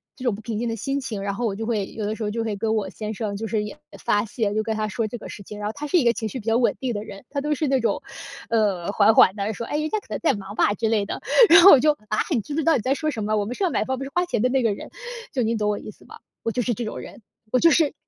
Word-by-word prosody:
这 260 - -10
种 225 -5 +2
不 215 - -10
平 215 -1 -4
静 240 - -1
的 225 - -2
心 275 +5 -2
情。 220 -7 -5
然 200 0 -2
后 240 +2 -2
我 200 -3 -1
就 220 +1 -4
会 215 -4 -1
有 215 -2 -4
的 215 +1 -2
时 220 - -5
候 210 - -1
就 230 +1 -2
会 215 -2 -2
跟 220 +2 -1
我 200 -3 -1
先 215 0 -5
生 205 -1 -3
就 225 - -4
是 210 0 0
也 210 - -7 0.3
发 205 +2 +2
泄， 210 -2 -2
就 215 - +1
跟 220 -1 -2
他 215 0 -1
说 220 +1 -2
这 240 - -6
个 - - -10
事 200 - -9
情。 210 +2 -9
然 210 - -3
后 215 - -3
他 295 - -5
是 355 - +3
一 295 - +3
个 235 - +6
情 220 +1 -3
绪 255 - -5
比 220 - -12
较 225 +1 +3
稳 245 - +2
定 255 -3 -2
的 205 0 -4
人， 200 -1 -10
他 280 0 -2
都 300 +1 0
是 300 +1 -1
那 265 -1 +2
种， 225 -3 0 0.5
呃， 200 -5 +1
缓 210 +1 +5
缓 190 - +6
地 205 +2 -2
说： 235 - -5
“哎， 295 - -1
人 310 0 -1
家 430 - 0
可 - - -23
能 - - -3
在 310 - +2
忙 205 0 -7
吧”， 205 - +3
之 225 +1 0
类 210 -3 +1
的。 - - -5 0.3
然 335 +2 +9
后 390 - +10
我 270 - +9
就： 300 +3 +4 0.2
“啊， 215 - 0
你 240 -7 +2
知 290 - -7
不 320 - 0
知 - - 0
道 325 - +5
你 240 - 0
在 260 +5 +1
说 310 +1 -1
什 220 -5 -4
么？ 215 +1 0
我 205 - 0
们 240 - -4
是 - - -2
要 365 - +3
买 - - 0
房， 260 - -1
我 - - -9
们 270 - -5
是 275 - -8
花 355 0 +2
钱 235 -11 -1
的 250 - +3
那 260 -1 +1
个 220 -3 +2
人。” - - -9 0.4
就 255 -4 +1
你 230 +1 0
懂 210 -1 0
我 205 - 0
意 - - -9
思 - - -21
吧？ - - -13 0.2
我 230 - 0
就 245 - -1
是 240 0 0
这 240 - -4
种 - - -5
人， - - -11 0.3
我 255 - +3
就 335 - +6
是 305 -3 +3
225 Hz, 390 characters per minute, -23 LUFS, 210-260 Hz, 0.5 s, 后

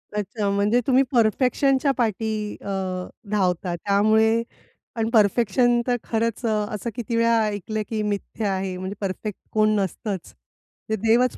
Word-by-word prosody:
अच्छा. 210 0 -2
म्हणजे 205 +4 +2
तुम्ही 265 +1 +5
परफेक्शनच्या 260 +4 +2
पाठी 215 -2 -1
अ, - - -14 0.7
धावता 180 -3 0
त्यामुळे 220 +4 +3 0.5
आणि 225 0 0
परफेक्शन 235 +3 +3
तर 245 - +2
खरंच 230 +1 -1
अ, - - +2 0.3
असं 235 +3 -4
किती 235 -1 -3
वेळा 230 0 +3
ऐकलं, 210 +1 -3
की 220 -2 -1
मिथ्या 205 0 -2
आहे. 190 -1 -2
म्हणजे 190 +2 -5
परफेक्ट 195 +1 -4
कोण 215 0 +3
नसतंच. 195 0 -4 0.6
ते 220 - +1
देवच 230 +4 +2
215 Hz, 135 wpm, -23 LUFS, 200-230 Hz, 0.7 s, तुम्ही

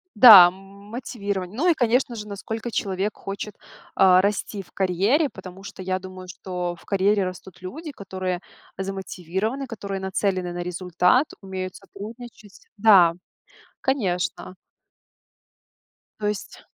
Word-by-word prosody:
Да, 205 -6 +11
мотивирование. 200 0 -6
Ну 355 +5 +3
и, 340 - +6
конечно 245 -2 +1
же, 210 - -6
насколько 220 +3 -5
человек 195 +1 -1
хочет, 200 +1 -6 0.4
а, 185 -1 +6
расти 205 0 -1
в - - -24
карьере, 200 - +2
потому 190 0 -11
что 195 - -9
я 185 0 -1
думаю, 185 -1 -10
что 180 -1 -4
в - - -19
карьере 200 0 +2
растут 185 0 -8
люди, 300 - -7
которые 185 -5 -4 0.4
замотивированы, 195 +6 -3
которые 200 -3 -5
нацелены 190 -2 -1
на 175 - -5
результат, 180 - +2
умеют 185 -2 -5
сотрудничать 210 +1 -11
Да, 195 -6 +6 0.7
конечно. 185 -8 -1 1.6
То 210 - -1
есть 210 -1 -5
195 Hz, 120 wpm, -24 LUFS, 185-215 Hz, 1.6 s, Да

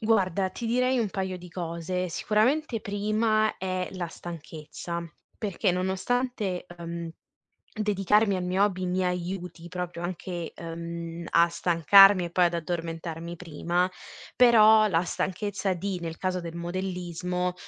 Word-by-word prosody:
Guarda, 195 -4 +2
ti 230 +5 -5
direi 250 +2 +2
un 225 - +1
paio 190 -1 -3
di 180 0 -11
cose. 175 +1 -3
Sicuramente, 225 - +1
prima 215 +2 +1
è 185 -1 -2
la 185 -2 -3
stanchezza, 170 0 -7 0.3
perché 200 -4 0
nonostante, 190 +2 -1
ehm, 170 -1 -6 0.6
dedicarmi 210 0 +2
al 185 - -2
mio 185 +2 +2
hobby 185 -2 -2
mi 180 +1 0
aiuti 180 -1 -4
proprio 180 -1 -5
anche, 175 -1 -4
ehm, 170 0 -6
a 170 0 +5
stancarmi 180 +3 +6
e - - -5
poi 180 +1 +4
ad 170 0 +1
addormentarmi 165 0 -4
prima, 175 +2 -1 0.5
però 220 -3 +7
la 170 -4 +2
stanchezza 190 +2 -2
di, 185 +2 -3
nel 165 -1 -5
caso 185 -1 -1
del 170 -1 -7
modellismo, 180 0 -3
180 Hz, 130 wpm, -27 LUFS, 170-200 Hz, 0.6 s, però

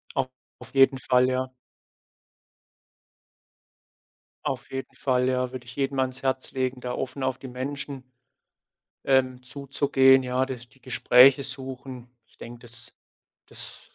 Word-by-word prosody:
Au 135 -2 +1 0.3
auf 130 +1 -13
jeden 135 0 +6
Fall, 125 0 +3
ja. 130 0 -2 2.9
Auf - - -3
jeden 135 0 -5
Fall, 125 -1 +1
ja. 125 -1 0
Würde 125 -1 -7
ich 120 +1 -11
jedem 135 -1 -1
ans 130 0 -1
Herz 130 -1 -1
legen, 130 -1 -2
da 125 0 -4
offen 135 +1 -4
auf 130 0 0
die 130 - -9
Menschen 135 +1 -5 1.0
ähm, 130 -1 +2
zuzugehen, 135 0 +3
ja, 125 +1 0
das 125 -2 -8
die 130 +4 -26
Gespräche 130 +2 +6
suchen. 130 -2 -8 0.2
Ich - - -28
denke, 120 0 -10
das 120 0 -14 0.5
das - - -9
130 Hz, 135 wpm, -26 LUFS, 125-135 Hz, 2.9 s, jeden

